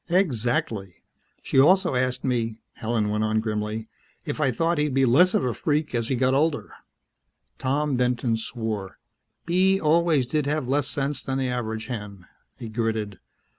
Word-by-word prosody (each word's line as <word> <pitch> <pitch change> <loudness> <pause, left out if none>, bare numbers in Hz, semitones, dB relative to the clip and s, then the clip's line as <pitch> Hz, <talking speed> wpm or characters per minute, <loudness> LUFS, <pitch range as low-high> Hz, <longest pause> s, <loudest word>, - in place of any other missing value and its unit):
"Exactly. 120 - 0 0.5
She - - +2
also 185 +5 +5
asked 125 0 0
me," 115 -3 -1 0.2
Helen 110 -2 -1
went 105 +1 0
on 110 0 +1
grimly, 110 0 -3 0.4
"if - - -3
I 140 - +3
thought 165 +6 0
he'd 150 -3 0
be 135 0 +4
less 150 +10 +5
of - - +2
a 125 - 0
freak 150 -1 -1
as 115 -2 -1
he 130 - 0
got 130 +1 +2
older." 145 +2 0 0.9
Tom 140 +1 0
Benton 125 -1 +1
swore. 110 -4 -4 0.5
"Bee 190 +3 +3
always 160 -3 +3
did 145 +3 -1
have 150 -3 -1
less 140 +1 +1
sense 140 0 -2
than 135 0 -3
the 130 -1 -1
average 110 -3 -3
hen," 105 -6 -7 0.3
he 115 - -7
gritted. 110 -3 -2
125 Hz, 165 wpm, -25 LUFS, 110-150 Hz, 0.9 s, also